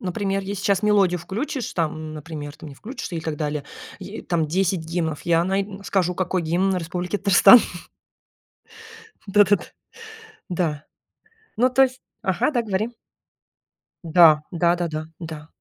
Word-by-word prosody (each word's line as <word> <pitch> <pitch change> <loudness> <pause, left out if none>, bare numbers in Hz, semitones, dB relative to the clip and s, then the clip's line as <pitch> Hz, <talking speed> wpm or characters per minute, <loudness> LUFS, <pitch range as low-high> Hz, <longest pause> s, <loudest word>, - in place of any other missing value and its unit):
Например, 195 +1 -2
если 195 0 -5
сейчас 200 0 +1
мелодию 195 -4 +3
включишь, 235 - -4
там, 155 -2 -3
например, 150 -1 -7
ты - - -11
мне 145 - -10
включишь, 245 +6 -7
и 165 - -3
так 160 -1 -4
далее 150 -1 -3 0.3
е - - -8
там 165 -2 0
10 185 +3 0
гимнов 160 -2 -3
я 170 -1 +2
най 195 +1 0 0.2
скажу 180 -3 0
какой 185 -1 -1
гимн 185 +4 +1
Республики 180 +3 -3
Татарстан. 200 +4 +7 1.7
Да 205 +1 +5
да 205 +1 +4
да. - - -8 0.9
Да. 160 -5 -2 0.7
Ну 250 +3 +3
то 265 +2 +4
есть 260 -1 0 0.2
ага, 195 +9 +1
да, 245 -5 0
говори. 210 0 -1 1.2
Да. 165 -2 +6
Да 170 0 +2
да 175 -1 -2
да. 155 0 -5
Да. 160 -3 -8
180 Hz, 150 wpm, -23 LUFS, 160-200 Hz, 1.7 s, Татарстан